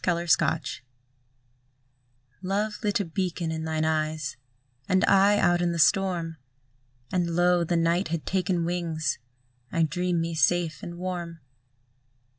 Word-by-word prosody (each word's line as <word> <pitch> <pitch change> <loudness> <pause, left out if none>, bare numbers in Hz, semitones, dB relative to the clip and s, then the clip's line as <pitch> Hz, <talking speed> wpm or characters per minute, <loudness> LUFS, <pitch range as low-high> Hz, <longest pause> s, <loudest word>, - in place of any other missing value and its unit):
THE 175 - +2
WRECKAGE 170 -4 0 1.6
Love 205 +3 -1
lit 210 -2 +1
a 200 - -1
beacon 175 -1 -2
in 160 0 -3
thine 155 0 -1
eyes, 155 -2 -1 0.5
And 185 +1 +3
I 200 +1 +5
out 175 -3 +3
in 175 -1 +1
the - - -3
storm, 170 -2 +2 0.7
And 170 -2 0
lo! 175 0 +3
the 170 +1 0
night 170 +3 +1
had 160 -1 -3
taken 185 -2 0
wings; 165 -4 -2 0.5
I 165 - +2
dream 175 +2 0
me 165 0 -2
safe 170 0 +1
and 175 0 -7
warm. 175 -2 -5
170 Hz, 135 wpm, -26 LUFS, 165-185 Hz, 1.6 s, I